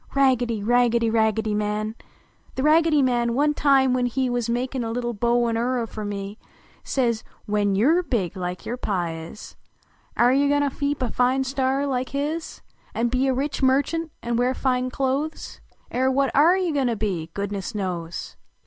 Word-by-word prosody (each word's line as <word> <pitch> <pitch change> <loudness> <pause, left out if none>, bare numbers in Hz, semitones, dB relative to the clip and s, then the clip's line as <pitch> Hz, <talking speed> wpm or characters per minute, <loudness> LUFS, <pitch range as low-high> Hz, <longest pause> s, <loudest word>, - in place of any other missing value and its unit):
Raggedy! 245 -5 +2
Raggedy! 235 0 +3
Raggedv 220 -1 +1
Man! 210 +1 -1 0.6
The 260 - -2
Raggedy 310 -1 +4
Man 240 -2 +1
one 295 +2 +2
time 270 -3 +3
when 250 -1 +1
he 260 +2 -1
\Yuz 240 -1 -1
makin 250 +1 -1
a 225 - -3
little 240 +1 -2
bow 235 +2 +1
n 230 -1 0
orry 245 0 0
fer 215 -1 -7
me, 205 +1 -5 0.4
Says 235 -4 0
" - - -34
When 205 -1 +1
\<>ii 200 - +2
rc 335 +6 +3
big 195 -9 -1
like 180 -1 -4
vour 245 - -4
Pa 185 -8 -1
is. 165 +5 -9 0.6
Air 240 +1 +5
you 280 +2 +3
go 290 0 +3
to 285 -2 0
keep 285 -2 -1
a 240 - -2
fine 255 +2 +2
store 270 +1 0
like 255 -2 -2
his 300 +4 -4 0.3
An 235 +1 +1
be 255 +2 +1
a 265 - +2
rich 280 +3 -2
merchtmt 285 +5 +1
an 235 0 -1
wear 250 +2 +1
fine 255 -1 0
clothes? 275 +4 -3 0.3
I - - -2
.r 260 0 +3
what 270 0 +1
oh 320 +6 +5
you 365 -4 0
go 280 -2 +1
to 240 -2 +1
be, 185 -7 -3
goodness 200 +1 -4
knows!" 175 -4 -4
245 Hz, 190 wpm, -24 LUFS, 220-270 Hz, 0.6 s, Air